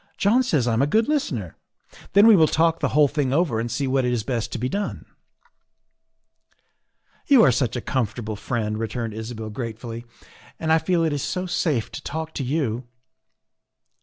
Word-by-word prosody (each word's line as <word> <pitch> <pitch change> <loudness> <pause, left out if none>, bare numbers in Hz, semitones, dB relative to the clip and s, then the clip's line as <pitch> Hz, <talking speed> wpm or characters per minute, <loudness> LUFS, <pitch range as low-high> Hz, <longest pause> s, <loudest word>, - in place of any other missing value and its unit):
''John 230 +6 +3
says 150 - +1
I 115 - +1
am 115 - +2
a 140 - +3
good 220 +8 +2
listener. 125 - -2 0.6
Then 200 +2 +7
we 225 -2 +8
will 160 -4 +5
talk 165 +1 +2
the - - +1
whole 150 -1 +6
thing 140 -2 -1
over 145 -6 +1
and 120 +1 -2
see 125 +4 -2
what 135 0 +1
is 125 -3 0
best 115 -1 -3
to - - -3
be 125 +2 -2
done." 200 +8 -4 1.1
" - - -42
You 275 -6 +7
are 135 - +6
such 125 -1 0
a 120 - -2
comfortable 110 -3 -2
friend," 110 0 -3
returned 115 0 -3
Isabel 110 0 -6
gratefully, 115 +1 -6 0.3
" - - -24
and 160 -1 +1
I 160 - +5
feel 170 +1 +1
it 160 -2 +1
is 145 - -2
so 180 +6 -2
safe 155 -9 -1
to - - -7
talk 160 +1 -5
to 140 - -3
you. 130 -4 -2
130 Hz, 195 wpm, -23 LUFS, 115-160 Hz, 1.1 s, we